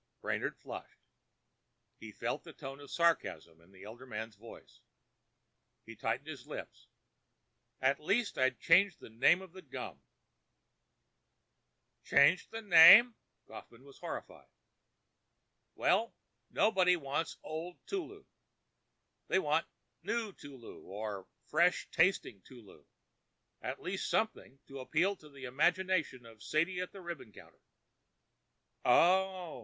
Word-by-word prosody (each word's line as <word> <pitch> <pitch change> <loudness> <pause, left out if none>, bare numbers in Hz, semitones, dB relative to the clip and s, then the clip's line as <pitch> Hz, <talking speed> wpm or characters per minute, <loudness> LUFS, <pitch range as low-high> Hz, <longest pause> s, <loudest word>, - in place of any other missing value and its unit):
Brainard - - -3
flushed. - - -10 1.0
He - - -10
felt - - -4
the - - -12
tone 135 +1 -9
of 145 -1 -12
sarcasm 85 - 0
in 85 +3 -23
the 95 0 -15
elder 120 +5 -11
man's 110 -1 -6
voice. 115 +3 -15 1.0
He - - -10
tightened - - -3
his - - -9
lips. - - -9 0.9
"At 135 +1 +2
least, 205 +8 0
I'd 130 -2 +1
change 180 +2 +4
the - - -13
name 170 +11 +3
of 185 -3 -14
the 185 - -11
gum!" 125 - -8 2.0
"Change 140 +6 +4
the 225 0 -7
name!" 205 +6 +9 0.3
Kaufmann - - -13
was 405 -1 -16
horrified. - - -8 1.3
"Well, 230 - +1 0.3
nobody 185 -4 +3
wants 155 0 -3
'Old 165 +3 -6
Tulu.' 400 +1 -6 1.0
They - - +2
want - - +1 0.3
'New 230 -3 -3
Tulu' 135 -7 -12
or 100 -1 -6 0.2
'Fresh 170 +4 +1
Tasty 175 - +1
Tulu.' 120 -6 -15 0.8
At 130 +2 -5
least, 190 +1 -3
something 215 -11 -2
to 135 0 -10
appeal 165 +9 0
to 150 - -16
the 140 -2 -10
imagination 165 -1 0
of 115 -2 -15
Sadie 170 +8 0
at 180 - -5
the 195 - -11
ribbon 170 -10 -8
counter." - - -17 1.2
"Oh!" 180 +2 +2
160 Hz, 120 wpm, -33 LUFS, 125-185 Hz, 2.0 s, name